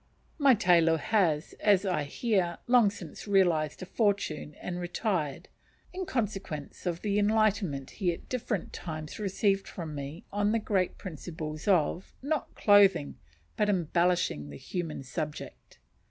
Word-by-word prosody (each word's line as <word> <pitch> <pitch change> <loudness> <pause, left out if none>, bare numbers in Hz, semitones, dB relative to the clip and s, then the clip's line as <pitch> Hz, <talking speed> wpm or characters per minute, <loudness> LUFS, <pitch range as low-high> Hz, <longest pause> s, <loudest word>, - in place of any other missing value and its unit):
My 275 -3 +6
tailor 170 -5 +4
has, 160 -3 +1
as 205 -2 +4
I 175 -6 0
hear, 180 - 0
long 240 -4 +5
since 195 -1 -9
realized 175 -5 +2
a - - -5
fortune 195 -8 -1
and 180 0 -5
retired, 175 - -2 0.5
in 370 0 -4
consequence 195 - -3
of 170 -1 -2
the 205 -1 +1
enlightenment 205 -9 +1
he 185 -5 0
at 170 - -9
different 235 -7 -3
times 155 +2 -6
received 195 -1 +1
from 165 -4 -6
me 145 +3 -7
on 205 +1 +1
the 230 - +2
great 195 -4 0
principles 155 -2 -6
of, 180 -1 +1
not 295 +1 -2
clothing, 200 -8 +4 0.4
but 210 -1 +1
embellishing 175 - +1
the 70 - -8
human 165 - -4
subject. 150 +3 -6
180 Hz, 140 wpm, -29 LUFS, 155-205 Hz, 0.5 s, My